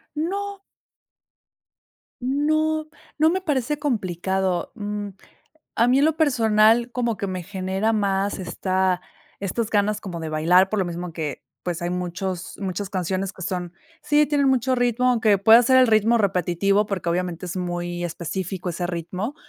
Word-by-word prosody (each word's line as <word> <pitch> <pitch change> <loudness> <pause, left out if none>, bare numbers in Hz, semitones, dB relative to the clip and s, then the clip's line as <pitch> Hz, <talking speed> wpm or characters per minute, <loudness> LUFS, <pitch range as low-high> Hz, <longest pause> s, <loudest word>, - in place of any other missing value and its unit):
No. 395 +5 -3 1.6
No, 310 +4 0 0.3
no 315 +1 +4
me 375 +2 0
parece 295 -4 -1
complicado. 190 - -1
Mm, 205 -1 -4 0.7
a 235 +2 +3
mí 260 +2 +4
en 290 - +4
lo 315 0 +1
personal 230 -4 +3
como 235 -4 -1
que 200 - -3
me 185 -2 -4
genera 190 +3 -1
más 200 -1 0
esta 185 0 0 0.4
estas 205 +3 -2
ganas 210 0 +1
como 180 -4 -6
de 160 -1 -4
bailar, 175 +5 +4
por 210 0 -1
lo 185 - +1
mismo 175 -1 -5
que, 155 -4 -5 0.2
pues, 175 -1 -4
hay 175 - -1
muchos 180 0 -4
muchas 195 0 -3
canciones 190 +1 -2
que 185 - -9
son 175 -1 -3 0.3
Sí, 300 0 +3
tienen 285 -1 +2
mucho 260 0 +2
ritmo, 245 0 +2
aunque 220 -4 +3
pueda 225 +5 +7
ser 260 +2 +4
el 255 - +7
ritmo 225 +2 +4
repetitivo, 195 +1 +1
porque 185 -4 -2
obviamente 180 0 -2
es 175 - -5
muy 175 -1 -3
específico 180 +2 -4
ese 175 +1 -3
ritmo, 185 - -4
200 Hz, 155 wpm, -23 LUFS, 180-245 Hz, 1.6 s, pueda